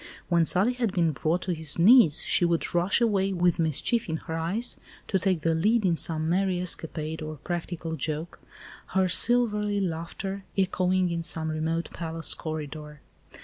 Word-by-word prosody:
When 170 -2 +3
Sully 195 +9 +2
had 235 -6 -2
been 170 -4 +2
brought 155 +6 -1
to 180 - -1
his 160 -3 -1
knees, 175 - +6
she - - +2
would 170 -1 0
rush 175 +6 +2
away, 195 -4 +1
with 175 -1 +1
mischief 165 - 0
in 160 - -1
her 160 - -7
eyes, 175 +9 -1 0.3
to 190 - 0
take 185 -3 0
the 165 +1 +1
lead 210 +7 +2
in 175 -2 +3
some 160 -1 -2
merry 185 +1 +1
escapade 160 -3 -3
or 155 0 -5
practical 170 +1 -5
joke, 155 +1 -4 0.6
her 190 -1 +4
silvery 210 0 +3
laughter 190 +2 -4
echoing 185 -1 +1
in 170 0 -2
some 160 -1 -1
remote 160 +2 -2
palace 165 -1 -1
corridor. 150 -2 -7
170 Hz, 165 wpm, -26 LUFS, 160-190 Hz, 0.6 s, knees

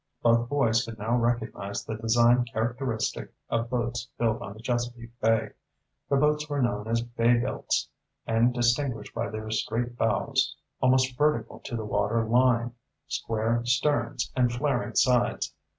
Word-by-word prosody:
Both 115 0 +3
boys 120 -6 +2
could 115 -1 -8
now 110 +3 0
recognize 115 -4 -1
the 110 - -4
design 120 +2 +3
characteristic 115 +1 -2 0.2
of 115 0 0
boats 120 0 -2
built 115 -1 0
on 100 - -6
the 110 - -14
Chesapeake 120 0 -3
Bay. 115 0 +2 0.6
The 140 - +3
boats 150 +1 +2
were 145 -1 -1
known 110 -4 0
as 115 +1 0
"bay 120 0 +2
builts," 125 +2 -1 0.4
and 115 +2 +3
distinguished 120 +1 0
by - - -2
their 110 0 -5
straight 120 +2 -1
bows - - +1 0.3
almost 130 0 +3
vertical 120 -7 0
to 120 - -6
the 110 -2 -3
water 105 +2 0
line 120 0 +3 0.3
square 115 -3 -1
sterns, 125 -1 0
and 125 -2 +3
flaring 125 0 -1
sides. 125 -2 +2
120 Hz, 150 wpm, -27 LUFS, 115-125 Hz, 0.6 s, Both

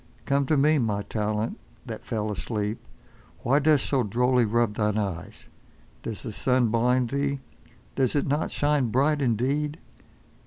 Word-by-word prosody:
Come 140 0 +1
to 155 - +3
me 150 +2 +4
my 105 -4 0
Talent 105 +1 -2 0.3
that - - -8
fell 105 -1 -2
asleep. 105 +2 -3 0.6
Why 135 +4 +3
dost 150 -1 +3
so 135 -2 +1
drolly 125 +3 +2
rub 115 0 +1
thine 105 -1 0
eyes. 100 -6 -4 0.5
Does 110 -2 -6
the 115 - -5
sun 125 +2 +2
blind 120 +2 +2
thee? 140 0 0 0.5
Does 130 0 +1
it 145 - +2
not 145 +3 0
shine 145 -4 +1
bright 145 +5 +2
indeed? 140 +5 0
125 Hz, 150 wpm, -26 LUFS, 110-140 Hz, 0.6 s, me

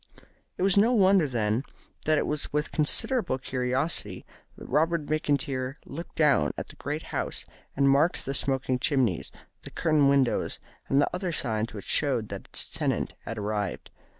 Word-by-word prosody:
It - - -1
was 195 0 +3
no 225 +5 +5
wonder, 195 -6 +5
then, 115 -2 0 0.4
that 155 0 +3
it - - +1
was 150 -1 -2
with 150 +1 -1
considerable 175 - +1
curiosity 125 - -2 0.3
that - - -10
Robert 165 0 +1
McIntyre 140 -4 -1
looked 165 +5 -8
down 140 - +3
at - - -5
the - - -10
great 150 +3 -4
house, - - -2 0.3
and 140 0 +4
marked 140 +5 +3
the 135 - -2
smoking 130 -2 0
chimneys, 125 - +1 0.3
the - - -9
curtained 150 -3 +3
windows, 135 -3 +2 0.3
and 135 - +4
the 145 - +3
other 180 0 -2
signs 110 -7 -1
which 100 - -7
showed 125 -7 +1
that 100 -1 -6
its - - -1
tenant - - -1
had 115 - -5
arrived. 105 -1 -3
140 Hz, 165 wpm, -27 LUFS, 125-155 Hz, 0.4 s, no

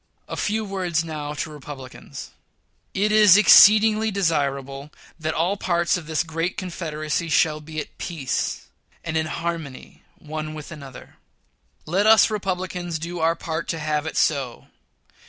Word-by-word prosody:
A - - -5
few 215 +1 -1
words 180 -5 -1
now 150 -2 -5
to 155 - -4
Republicans: 140 -3 -10 0.6
It 210 +2 +1
is 210 -3 +7
exceedingly 215 +1 +7
desirable 140 -7 -1 0.3
that 155 0 -2
all 180 +5 0
parts 175 -2 +1
of 170 -4 -6
this 160 0 0
great 165 +2 -3
confederacy 165 -3 -3
shall 155 0 +2
be 155 +1 -6
at - - -8
peace 150 -7 -3 0.4
and 165 -1 -4
in 160 0 0
harmony 165 -5 -5 0.2
one 155 0 -6
with 155 +1 -9
another. 140 -5 -11 0.7
Let 190 +6 +1
us 220 -1 +6
Republicans 180 -4 -3
do 170 +2 -6
our 165 +1 +2
part 160 0 -4
to 165 - -3
have 150 0 -1
it - - -5
so. 135 -6 0
160 Hz, 145 wpm, -23 LUFS, 150-185 Hz, 0.7 s, is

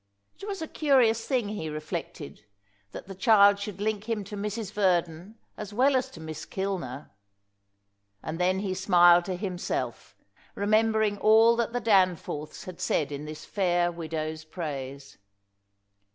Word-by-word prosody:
It 400 - -8
was 390 -5 -4
a - - -5
curious 250 -8 +2
thing, 245 -7 0
he 185 -7 -4
reflected, 155 - -6 0.5
that - - -9
the 195 - -7
child 200 0 +5
should 200 -2 -6
link 215 +1 -2
him 220 -3 -1
to 200 +2 -8
Mrs. 210 0 -4
Verdon 180 0 0 0.2
as 210 -1 -7
well 265 +4 +4
as 255 - 0
to - - -13
Miss 160 -1 -7
Kilner. 180 -9 -5 1.1
And 160 +2 -5
then 185 +2 +1
he 195 -2 -2
smiled 175 -2 +5
to 185 - -3
himself, 180 -1 -4 0.4
remembering 215 0 +2
all 225 +2 +5
that 235 -1 0
the 245 - -1
Danforths 185 -8 0
had 185 -2 -9
said 145 -2 0
in 145 +1 -5
this 155 0 -8
fair 175 -3 +1
widow's 160 -2 -5
praise. 140 -5 -7
190 Hz, 150 wpm, -27 LUFS, 165-215 Hz, 1.1 s, child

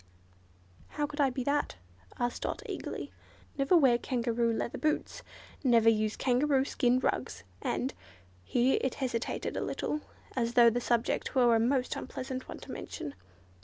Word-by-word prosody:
"How 295 - -2
could 290 +1 -3
I 275 - +4
be 255 0 -3
that?" 285 +2 0 0.4
asked 240 0 -2
Dot, - - -3
eagerly. - - -5 0.4
"Never 275 +6 +4
wear 255 -6 +5
kangaroo 235 -2 0
leather 230 +1 -2
boots—never 260 - +1
use 215 -1 +1
kangaroo 265 +1 +2
skin 250 -3 +2
rugs, 255 - -1 0.2
and"—here 90 - -1
it 260 - -1
hesitated 250 -3 -2
a - - -1
little, 300 - -2 0.3
as 235 -2 0
though 235 -1 +8
the 245 +2 -1
subject 235 +2 0
were 240 -3 +5
a - - +4
most 250 +2 +1
unpleasant 255 0 -5
one - - -6
to - - -9
mention. 145 - -6
245 Hz, 145 wpm, -31 LUFS, 235-270 Hz, 0.4 s, though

